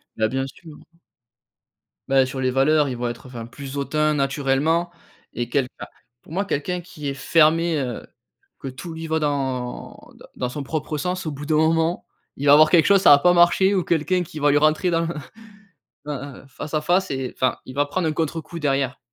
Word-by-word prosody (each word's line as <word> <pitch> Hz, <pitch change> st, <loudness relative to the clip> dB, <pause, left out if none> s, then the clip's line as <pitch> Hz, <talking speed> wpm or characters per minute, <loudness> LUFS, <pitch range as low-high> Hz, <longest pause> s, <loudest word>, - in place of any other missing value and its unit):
Bah, 110 Hz, -, +1 dB
bien 135 Hz, +3 st, -2 dB
sûr. 155 Hz, +2 st, -13 dB, 1.3 s
Bah, 135 Hz, -1 st, +4 dB
sur 130 Hz, +1 st, -6 dB
les 130 Hz, -1 st, +1 dB
valeurs, 145 Hz, +3 st, +3 dB
ils 130 Hz, -, -3 dB
vont 120 Hz, 0 st, -2 dB
être, 120 Hz, 0 st, -8 dB
enfin, 120 Hz, -3 st, -8 dB
plus 135 Hz, +3 st, -9 dB
hautains 150 Hz, +2 st, +1 dB
naturellement 145 Hz, +4 st, 0 dB, 0.4 s
et 120 Hz, 0 st, -3 dB
quelqu 135 Hz, -3 st, 0 dB
enfin, -, -, -9 dB, 0.3 s
pour -, -, -18 dB
moi, 195 Hz, +4 st, -1 dB
quelqu'un 180 Hz, 0 st, -2 dB
qui 170 Hz, -5 st, -7 dB
est -, -, -3 dB
fermé, 165 Hz, +3 st, +3 dB
heu, 125 Hz, -3 st, -5 dB, 0.5 s
que 135 Hz, -, -6 dB
tout 135 Hz, +6 st, -8 dB
lui 160 Hz, 0 st, -6 dB
va 160 Hz, 0 st, 0 dB
dans 135 Hz, -4 st, -3 dB, 0.2 s
dans -, -, -15 dB
dans 125 Hz, -, -2 dB
son 140 Hz, +3 st, -5 dB
propre 150 Hz, +1 st, -3 dB
sens, 180 Hz, +4 st, -3 dB
au 155 Hz, -, -2 dB
bout 145 Hz, +1 st, -7 dB
d'un 155 Hz, +1 st, +1 dB
moment, 160 Hz, +2 st, +1 dB, 0.3 s
il 140 Hz, -, -4 dB
va 140 Hz, -, +8 dB
avoir 155 Hz, +1 st, +7 dB
quelque 165 Hz, -1 st, +5 dB
chose, 200 Hz, -1 st, +5 dB
ça -, -, +6 dB
va 145 Hz, -, +9 dB
pas 180 Hz, +4 st, +4 dB
marcher 180 Hz, +3 st, +4 dB
ou 185 Hz, -, +1 dB
quelqu'un 175 Hz, +3 st, 0 dB
qui 155 Hz, -2 st, -9 dB
va 145 Hz, 0 st, +3 dB
lui 145 Hz, -, +4 dB
rentrer 155 Hz, +4 st, +2 dB
dans 165 Hz, -1 st, +1 dB
l 165 Hz, 0 st, -3 dB, 0.9 s
dans, 140 Hz, -2 st, -6 dB
heu, -, -, -19 dB
face 145 Hz, +3 st, -8 dB
à 155 Hz, -, +2 dB
face 180 Hz, +5 st, +1 dB
et 135 Hz, -2 st, -3 dB
enfin, 130 Hz, -, +1 dB
il 130 Hz, -, -9 dB
va 145 Hz, +1 st, +1 dB
prendre 165 Hz, +4 st, -2 dB
un 155 Hz, -, +1 dB
contrecoup, 160 Hz, +1 st, -4 dB
derrière. 135 Hz, -2 st, 0 dB
150 Hz, 215 wpm, -22 LUFS, 135-165 Hz, 1.3 s, va